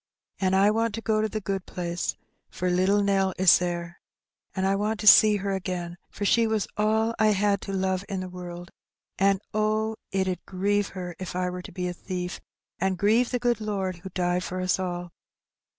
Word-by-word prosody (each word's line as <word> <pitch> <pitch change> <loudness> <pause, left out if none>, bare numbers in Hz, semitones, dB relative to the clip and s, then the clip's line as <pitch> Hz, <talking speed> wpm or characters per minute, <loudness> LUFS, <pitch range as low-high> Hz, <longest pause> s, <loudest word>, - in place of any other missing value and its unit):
An' 190 -1 +2
I 200 +2 +5
want 225 0 0
to 225 - -5
go 220 -1 +1
to 220 - 0
the 215 - -3
good 195 -2 -4
place, 175 -1 -3 0.3
for 180 0 -2
little 190 +3 +3
Nell 195 -1 +1
is 185 -2 +6
there; 175 -1 -4 0.5
an' 190 - 0
I 195 +1 +2
want 210 +2 -1
to - - -5
see 210 0 +8
her 200 0 -2
again, 180 -2 -3
for 205 - -5
she 230 +3 +4
was 220 -3 0
all 220 +2 +1
I 220 - +5
had 200 0 +1
to 195 - -6
love 190 -1 0
in 195 -2 -2
the 185 - -5
world, 175 -1 -8 0.5
an' 195 0 +3
oh! 215 +1 0 0.2
it 190 -1 0
'ud 185 -1 -3
grieve 200 +2 0
her 180 -1 -4
so - - -15
if 180 -1 -5
I 180 0 -1
were 180 0 -5
to - - -10
be 180 +1 -3
a 180 - -3
thief, 180 0 -5 0.4
an' 190 +1 +1
grieve 220 +6 +3
the 250 - 0
good 240 -2 0
Lord 195 -4 -2
who 185 +3 -9
died 180 0 0
for 185 0 -4
us 185 0 +1
all. 175 -1 -4
190 Hz, 215 wpm, -26 LUFS, 180-210 Hz, 0.5 s, see